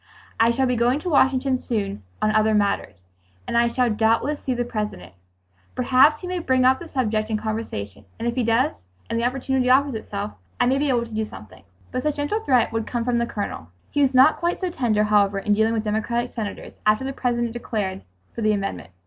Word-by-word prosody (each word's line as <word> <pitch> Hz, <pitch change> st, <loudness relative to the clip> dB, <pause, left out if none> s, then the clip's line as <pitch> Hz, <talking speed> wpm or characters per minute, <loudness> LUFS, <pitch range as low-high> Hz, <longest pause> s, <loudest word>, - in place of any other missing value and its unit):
"I 225 Hz, +1 st, +5 dB
shall 255 Hz, +3 st, +1 dB
be 250 Hz, -1 st, +1 dB
going 240 Hz, +3 st, +2 dB
to 355 Hz, -, -3 dB
Washington 265 Hz, -2 st, +3 dB
soon 200 Hz, -, -3 dB, 0.2 s
on 215 Hz, -, +3 dB
other 215 Hz, 0 st, +3 dB
matters, 200 Hz, -, 0 dB, 0.5 s
and -, -, -4 dB
I 235 Hz, 0 st, +4 dB
shall 245 Hz, 0 st, +1 dB
doubtless 230 Hz, +7 st, +1 dB
see 255 Hz, -, -2 dB
the 245 Hz, 0 st, -1 dB
President. 210 Hz, -, -5 dB, 0.6 s
Perhaps 260 Hz, +4 st, +4 dB
he -, -, -6 dB
may 365 Hz, 0 st, -2 dB
bring 260 Hz, -5 st, +2 dB
up 260 Hz, +1 st, +4 dB
the 345 Hz, -, -9 dB
subject 220 Hz, -7 st, -1 dB
in 220 Hz, -, 0 dB
conversation, 215 Hz, -, -5 dB
and 230 Hz, -, -3 dB
if 235 Hz, -, 0 dB
he 250 Hz, 0 st, 0 dB
does, 235 Hz, +6 st, +2 dB, 0.4 s
and 230 Hz, -, 0 dB
the -, -, -1 dB
opportunity 260 Hz, 0 st, 0 dB
offers 275 Hz, +2 st, +4 dB
itself, 210 Hz, -2 st, -5 dB, 0.3 s
I 245 Hz, -, +4 dB
may 265 Hz, +2 st, +2 dB
be 290 Hz, 0 st, +1 dB
able 240 Hz, -2 st, +1 dB
to 230 Hz, -, -12 dB
do 220 Hz, 0 st, 0 dB
something." 105 Hz, -, -11 dB, 0.3 s
Some 255 Hz, -, -2 dB
such 300 Hz, +1 st, -1 dB
gentle 290 Hz, +9 st, -1 dB
threat 255 Hz, -, +2 dB
would 225 Hz, -1 st, -2 dB
come 235 Hz, -2 st, -2 dB
from 245 Hz, -1 st, +1 dB
the 235 Hz, -, 0 dB
Colonel. 200 Hz, -, -5 dB, 0.2 s
He 290 Hz, -, +1 dB
was 270 Hz, -1 st, +2 dB
not 265 Hz, +5 st, +6 dB
quite 345 Hz, +1 st, -1 dB
so 370 Hz, -2 st, -2 dB
tender, 225 Hz, -9 st, +1 dB
however, 205 Hz, -1 st, +3 dB
in 205 Hz, +1 st, +1 dB
dealing 220 Hz, +2 st, +2 dB
with 220 Hz, -1 st, -1 dB
Democratic 230 Hz, +3 st, -1 dB
senators, 215 Hz, -3 st, -6 dB
after 215 Hz, +4 st, +2 dB
the 270 Hz, -, -3 dB
President 240 Hz, -2 st, -1 dB
declared 205 Hz, -5 st, -3 dB, 0.3 s
for -, -, -6 dB
the 215 Hz, -1 st, +3 dB
amendment. 195 Hz, -, -4 dB
235 Hz, 220 wpm, -23 LUFS, 215-260 Hz, 0.6 s, not